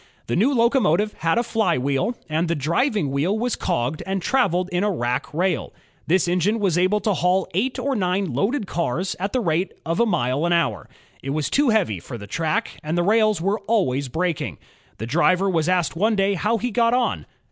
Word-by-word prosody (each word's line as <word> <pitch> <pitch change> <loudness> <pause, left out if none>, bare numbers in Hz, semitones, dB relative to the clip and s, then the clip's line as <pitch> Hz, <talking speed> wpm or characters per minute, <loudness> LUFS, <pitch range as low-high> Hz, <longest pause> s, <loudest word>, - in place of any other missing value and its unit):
The 120 - -2
new 235 +10 +3
locomotive 230 - +2
had 165 0 +1
a 235 - +2
flywheel, 185 - 0
and 160 +3 0
the 170 - 0
driving 170 - 0
wheel 160 +10 0
was 240 +1 -1
cogged 125 +6 -2
and 195 0 -1
traveled 185 -5 +1
in 180 +2 0
a 210 - +2
rack 125 -9 -2
rail. 180 +4 -1 0.3
This 180 +1 +2
engine 180 +6 +1
was 195 -6 +1
able 185 +4 +2
to 210 +1 +1
haul 180 +1 +1
eight 240 +9 0
or 275 -1 -1
nine 185 - -1
loaded 205 - 0
cars 175 +1 -2
at 195 +2 -2
the 255 - 0
rate 175 -1 0
of 165 +1 -1
a 235 - +3
mile 130 - 0
an 175 - +2
hour. 140 - 0 0.3
It 135 - -6
was 155 -2 -2
too 285 -2 +3
heavy 195 - +1
for 120 +8 -8
the 105 - -9
track, 155 +9 -2
and 155 +3 -3
the 175 - +2
rails 215 -1 +3
were 200 +4 0
always 140 - +1
breaking. 165 +4 -2 0.4
The 110 - -5
driver 180 +8 +2
was 170 -3 +1
asked 180 -4 +1
one 215 +6 +2
day 195 0 +2
how 210 +5 0
he 245 +2 -3
got 235 +1 +2
on. 250 -1 -1
180 Hz, 205 wpm, -22 LUFS, 160-215 Hz, 0.4 s, new